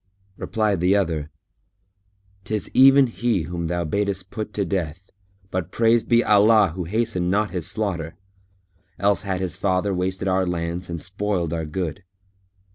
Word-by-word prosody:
Replied 105 -3 -1
the 90 +3 +3
other, 80 -7 -1 1.1
"'Tis 110 0 -4
even 135 +1 +7
he 115 -6 -1
whom 85 +1 -4
thou 85 +1 -1
badest 100 +2 -2
put 110 -1 -5
to 100 - 0
death, 90 -1 -4 0.4
but 90 -2 -2
praised 115 0 +2
be 120 0 +4
Allah 105 -1 +5
who 90 -2 -4
hastened 105 -2 -1
not 105 +2 +1
his 90 -2 -3
slaughter! 90 -6 -3 0.8
Else 100 +1 +2
had 95 -2 -3
his 90 -3 -2
father 95 +1 0
wasted 95 +1 -2
our 95 0 +1
lands 85 +1 -3
and 85 -1 -4
spoiled 90 -1 -2
our 80 -1 -2
good." 85 +3 -4
95 Hz, 150 wpm, -23 LUFS, 85-105 Hz, 1.1 s, even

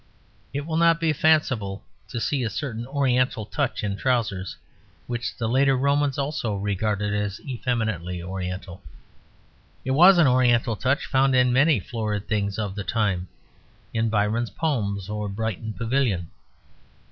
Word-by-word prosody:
It 140 +2 -3
will 160 0 -2
not 165 0 +4
be 165 -2 +2
fanciful 135 -11 +1 0.2
to 120 - -4
see 145 +3 0
a 115 - -1
certain 120 0 -4
oriental 125 -5 +1
touch 140 +1 -2
in 100 -1 -1
trousers, 100 -8 -1 0.5
which 120 -1 -4
the 115 - -1
later 135 +3 +3
Romans 140 +1 +1
also 140 -6 -2
regarded 105 +1 -1
as 105 -1 -2
effeminately 110 - -2
oriental; 90 0 -5 1.0
it 130 - -1
was 175 +7 +7
an 170 - +6
oriental 125 -3 +3
touch 130 +6 0
found 135 0 +2
in 125 -1 +4
many 145 0 +4
florid 105 0 -3
things 100 -2 -1
of 105 -3 -2
the 100 0 -5
time 95 -5 0 0.7
in 115 0 +1
Byron's 110 +2 0
poems 100 - -2
or 105 0 -3
Brighton 110 0 -3
Pavilion. 115 -7 -1
115 Hz, 145 wpm, -24 LUFS, 100-135 Hz, 1.0 s, was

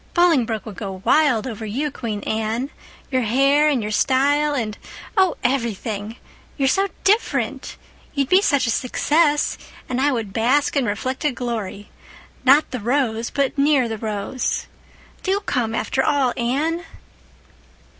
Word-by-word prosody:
Bolingbroke 265 - +2
would 210 -5 -9
go 195 -3 -6
wild 290 -8 +3
over 225 -4 -6
you, 265 +8 -2
Queen 220 -6 -4
Anne—your 230 +4 -3
hair 275 +6 +3
and 260 -7 0
your 210 - -3
style 285 +6 +2
and, 220 -5 -2 0.4
oh, 380 -4 +3
everything! 225 -4 -2 0.4
You're 275 -2 +2
so 390 +7 +2 0.2
different. 420 +4 0 0.4
You'd 275 -2 +1
be 370 +6 +5
such 285 -10 +2
a 230 - +1
success—and 290 -1 0
I 290 +1 +3
would 225 -6 -3
bask 255 +7 +2
in 275 -3 +2
reflected 255 +6 -2
glory—'not 240 +4 -1
the 255 - -3
rose 230 -1 0
but 280 -2 0
near 280 -3 +3
the 220 -1 -5
rose.' 215 +4 -2 0.6
Do 390 +1 0
come, 230 - -1
after 265 +3 0
all, 270 -4 +2
Anne." 295 +8 -1
255 Hz, 135 wpm, -21 LUFS, 225-290 Hz, 0.6 s, be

